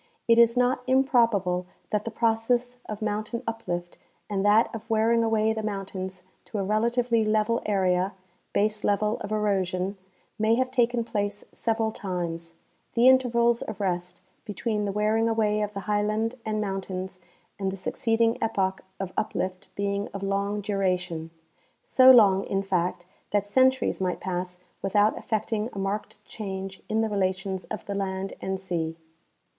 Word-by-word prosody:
It 230 0 +6
is 235 +1 +5
not 250 +1 +2
improbable 230 - +3 0.2
that 210 0 0
the - - -2
process 235 +2 +1
of 215 0 -4
mountain 215 +3 -2
uplift 175 -6 -4 0.3
and 195 -1 0
that 210 +3 +4
of 225 0 -7
wearing 225 +1 +3
away 220 -1 +2
the 220 - -3
mount 195 -2 -4
ains 185 -1 -5 0.2
to 215 - -6
a 200 - 0
relatively 230 +3 +2
level 215 +2 +1
area 190 -1 +1 0.4
(baselevel 210 0 +1
of 200 - -5
erosion) 195 -2 0 0.4
may 220 +1 +4
have 255 +1 0
taken 245 -2 +2
place 205 -2 -2
several 225 -1 0
times, 170 -4 -4 0.4
the 240 +2 +5
intervals 235 -2 +4
of 220 - -6
rest 180 -2 -2 0.2
between 210 +1 -2
the 200 - -1
wear 210 +2 +1
ing 225 +1 +2
away 215 -2 +1
of 210 0 -1
the 200 - -3
highland 210 +3 0
and 215 -1 -2
mountains 190 -2 -4 0.4
and 195 -1 -1
the 195 - -6
succeeding 225 +4 +1
epoch 195 -4 0 0.2
of 195 -2 -4
uplift 185 -3 -2
being 200 0 -1
of 200 - -4
long 200 +1 -1
duration 180 -5 -1 0.3
— - - -40
so 260 0 +6
long, 200 -6 +7
in 195 0 -1
fact, 180 -2 -1 0.2
that 205 -1 +1
centuries 260 +1 +2
might 180 -1 -1
pass 180 -1 -3 0.2
without 205 +2 +3
effecting 220 0 -1
a - - -8
marked 205 +1 -4
change 190 -2 -6
in 220 +1 +2
the 225 - 0
re 205 - -2
lations 190 0 -1
of - - -6
the 200 - -4
land 195 -1 -3
and 190 0 -2
sea. 165 -4 -3
210 Hz, 160 wpm, -26 LUFS, 190-225 Hz, 0.4 s, long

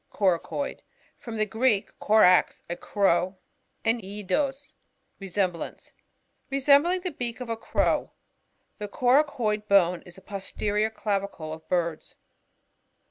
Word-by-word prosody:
CoRACoin. 195 +8 -1 0.2
— - - -35
From 230 -2 -7
the 215 - +2
Greek, 220 0 +1
korax^ 210 -4 +4
a 175 - -3
crow, 185 0 +1 0.5
and 225 +1 +2
eldos^ 210 +9 -2 0.5
lesemblance. 185 -2 -3 0.6
Resembling 285 +7 +4
the 365 0 -3
beak 240 -5 -5
of 250 -2 -6
a 230 - 0
crow. 225 - 0 0.7
The 210 - -4
coracoid 245 -3 +1
bone.is 180 -3 +2
the 190 - -14
posterior 205 +2 -2
clavicle 200 -6 -3
of 160 0 -12
birds. 170 -3 -1
210 Hz, 115 wpm, -26 LUFS, 185-245 Hz, 0.7 s, korax^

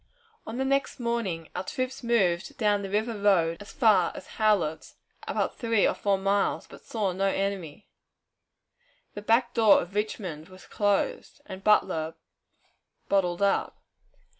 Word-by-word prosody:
On 225 - -5
the 265 - 0
next 275 0 0
morning, 230 -9 -2
our 180 - -2
troops 255 +6 -4
moved 195 -8 +1
down 205 -2 +2
the 195 - -5
river 220 +3 -1
road 175 -5 +3
as 205 - -10
far 210 -8 +3
as - - -8
Howlett's, 200 -8 +1 0.3
about - - -2
three 230 -4 +2
or - - +1
four 200 -1 0
miles, 195 +1 0
but - - -14
saw 210 -4 -2
no 190 +2 -1
enemy. 195 -3 -3 1.3
The 205 - -7
"back 235 +3 +2
door" 220 -3 +6
of 175 +3 -6
Richmond 190 -6 -4
was 185 0 -14
closed, 205 - -1
and 190 -4 -9
Butler 165 -6 +2 0.9
"bottled 190 -1 +1
up." 200 - +1
200 Hz, 145 wpm, -27 LUFS, 185-225 Hz, 1.3 s, door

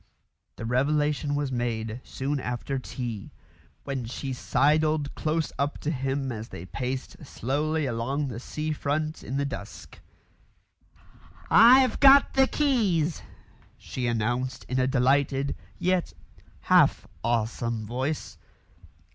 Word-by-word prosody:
The - - -6
revelation 145 +4 +1
was 145 -2 -1
made 115 -1 -2
soon 140 +2 -3
after 130 +2 -3
tea, 120 -5 -6 0.5
when 135 -4 -3
she 130 +3 -4
sidled 150 +3 +1
close 155 0 -1
up 140 +1 0
to 150 - -1
him 135 -1 -2
as 110 0 -6
they 85 - -8
paced 130 +8 -5
slowly 150 +4 -1
along 135 +4 -1
the 120 -3 -5
sea 155 +4 -4
front 155 +1 -2
in 135 - -3
the 140 - 0
dusk. 115 -6 -8 1.5
"I've 255 +3 +7
got 275 0 +7
the 265 0 +4
keys," 205 - +1 0.6
she 125 -2 -4
announced 120 +3 -1
in 130 - -1
a 130 - +2
delighted, 135 +2 +2 0.2
yet 180 0 0 0.5
half - - +4 0.2
awesome 115 -1 -1
voice. 130 +7 -3
135 Hz, 120 wpm, -27 LUFS, 120-150 Hz, 1.5 s, I've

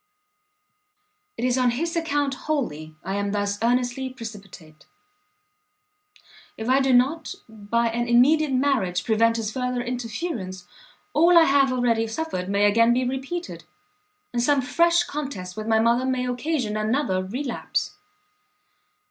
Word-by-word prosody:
"It 240 - -2
is 255 0 +1
on 250 -1 +3
his 330 +8 -2
account 290 -4 0 0.2
wholly 155 - -2
I 190 +2 -3
am 200 0 -2
thus 205 0 -1
earnestly 245 +2 0
precipitate. 195 - -11 1.7
If 220 - -5
I 260 +2 +4
do 270 -1 +2
not 275 +6 +2
by 220 +2 -1
an 240 +1 -2
immediate 280 +5 +4
marriage 255 -10 +1
prevent 230 +1 +2
his 220 -2 -3
further 250 0 -2
interference, 235 - -5 0.5
all 340 +3 +5
I 335 - +8
have 275 -3 +3
already 235 -3 +1
suffered 220 -7 -4
may 200 +1 +2
again 230 +3 +4
be 255 +1 0
repeated, 265 - -5 0.7
and 240 - 0
some 285 +3 +3
fresh 340 +7 +3
contest 270 - -6
with 215 0 -6
my 220 -1 +3
mother 235 +3 +2
may 255 -1 0
occasion 250 -3 -2
another 215 -3 0
relapse." 245 +6 -3
245 Hz, 135 wpm, -24 LUFS, 215-275 Hz, 1.7 s, I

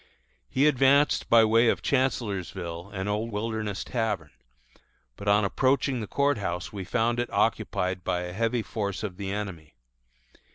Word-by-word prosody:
He 135 - +2
advanced 140 0 +3
by 115 -1 +7
way 115 +2 +4
of - - 0
Chancellorsville 95 -8 -2
and 95 -1 -4
old 105 +3 -1
Wilderness 110 -1 -3
Tavern; 105 - -2 0.8
but 100 - -9
on 100 0 +4
approaching 130 +4 +1
the 105 - -5
Court 140 0 +1
House 90 -2 -4
we 100 -2 -5
found 120 +4 0
it 120 - -2
occupied 90 0 0
by 90 0 -1
a 90 0 -5
heavy 115 +3 0
force 100 -2 -3
of 95 -4 -5
the 100 -1 -4
enemy. 95 -7 -6
105 Hz, 155 wpm, -27 LUFS, 95-120 Hz, 0.8 s, by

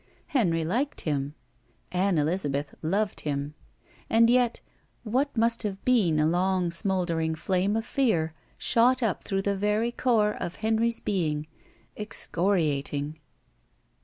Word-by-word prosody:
Henry 180 - +1
liked 255 - -1
him. 145 -1 -2 0.6
Ann 185 0 +1
Elizabeth 145 -3 -1
loved 195 +6 0
him. 145 0 -3 0.6
And 230 +1 +5
yet, 245 -1 +2 0.4
what 255 +4 -1
must 230 +1 +3
have 200 -3 -4
been 200 -12 +3
a 155 - +3
long 180 +1 +1
smoldering 170 -3 +1
flame 190 +5 0
of 225 0 -1
fear 175 - +1 0.2
shot 250 +2 +3
up 220 -5 -1
through 195 0 -1
the 200 0 0
very 210 +4 0
core 225 -4 +2
of 175 - -5
Henry's 225 +1 0
being, 155 -7 -1 0.5
excoriating. 155 -7 -1
190 Hz, 125 wpm, -27 LUFS, 160-225 Hz, 0.6 s, And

